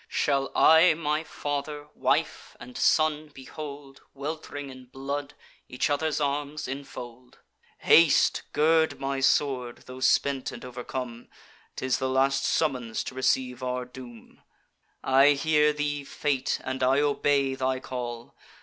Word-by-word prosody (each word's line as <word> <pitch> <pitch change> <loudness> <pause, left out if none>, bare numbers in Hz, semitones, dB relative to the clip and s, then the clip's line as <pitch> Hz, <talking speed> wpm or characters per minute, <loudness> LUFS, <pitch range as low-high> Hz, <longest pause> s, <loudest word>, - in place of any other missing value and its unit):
Shall 135 0 0
I 160 +1 +6
my 155 0 -1
father, 145 -1 -5
wife, - - -1
and 125 0 -11
son 155 -1 +2
behold, 140 0 -10
Welt'ring 145 -1 -6
in 130 -1 -12
blood, 140 +3 -5 0.3
each 125 +4 -1
other's 155 +1 0
arms 145 +1 -2
infold? 125 -2 -9 0.4
Haste! 165 -2 +5
gird 160 +1 +2
my 135 0 -2
sword, 135 -3 0
tho' 130 0 -10
spent 130 +1 +1
and - - -9
overcome: 125 -1 -6 0.5
'Tis 130 -1 -1
the 130 - -1
last 135 +1 +2
summons 125 -8 0
to - - -7
receive 130 -1 0
our 125 0 -3
doom. 125 -2 -13 0.6
I 135 +2 +5
hear 150 +1 +3
thee, 145 -1 -2
Fate; 140 -1 -1
and 130 0 -4
I 130 +2 +3
obey 140 -2 +1
thy 130 0 -1
call! 120 -2 -6
135 Hz, 130 wpm, -27 LUFS, 130-145 Hz, 0.6 s, I